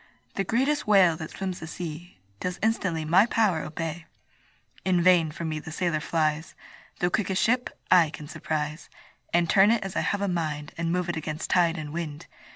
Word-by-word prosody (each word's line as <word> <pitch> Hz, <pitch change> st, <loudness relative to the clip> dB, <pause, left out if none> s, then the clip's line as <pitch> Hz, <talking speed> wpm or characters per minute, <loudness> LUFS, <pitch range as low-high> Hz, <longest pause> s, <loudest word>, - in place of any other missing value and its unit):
The 195 Hz, -, -1 dB
greatest 265 Hz, +8 st, 0 dB
whale 190 Hz, -5 st, +5 dB
that 160 Hz, -, -6 dB
swims 190 Hz, -2 st, -5 dB
the 160 Hz, -, -7 dB
sea 165 Hz, -, -7 dB, 0.2 s
Does 180 Hz, -1 st, -3 dB
instantly 185 Hz, -8 st, 0 dB
my 185 Hz, +8 st, +5 dB
power 210 Hz, -9 st, +2 dB
obey. 165 Hz, +1 st, -5 dB, 0.8 s
In 185 Hz, -2 st, +2 dB
vain 170 Hz, -2 st, +5 dB
from 165 Hz, +2 st, -5 dB
me 155 Hz, 0 st, -3 dB
the 160 Hz, -, -9 dB
sailor 170 Hz, -2 st, 0 dB
flies, 155 Hz, 0 st, -1 dB, 0.4 s
The 175 Hz, 0 st, 0 dB
quickest 190 Hz, -1 st, 0 dB
ship 250 Hz, +2 st, +2 dB, 0.2 s
I 175 Hz, -4 st, +6 dB
can 150 Hz, -1 st, -9 dB
surprise, 150 Hz, +1 st, -4 dB, 0.4 s
And 175 Hz, 0 st, +3 dB
turn 195 Hz, +4 st, +5 dB
it 230 Hz, -1 st, +2 dB
as 195 Hz, -1 st, -6 dB
I -, -, +2 dB
have 200 Hz, -, -1 dB
a -, -, +1 dB
mind, 155 Hz, -4 st, -3 dB
And 165 Hz, 0 st, -2 dB
move 180 Hz, 0 st, 0 dB
it 175 Hz, -, -2 dB
against 155 Hz, 0 st, -4 dB
tide 175 Hz, -2 st, +3 dB
and 150 Hz, -2 st, -6 dB
wind. 155 Hz, -3 st, -5 dB
170 Hz, 190 wpm, -26 LUFS, 155-190 Hz, 0.8 s, I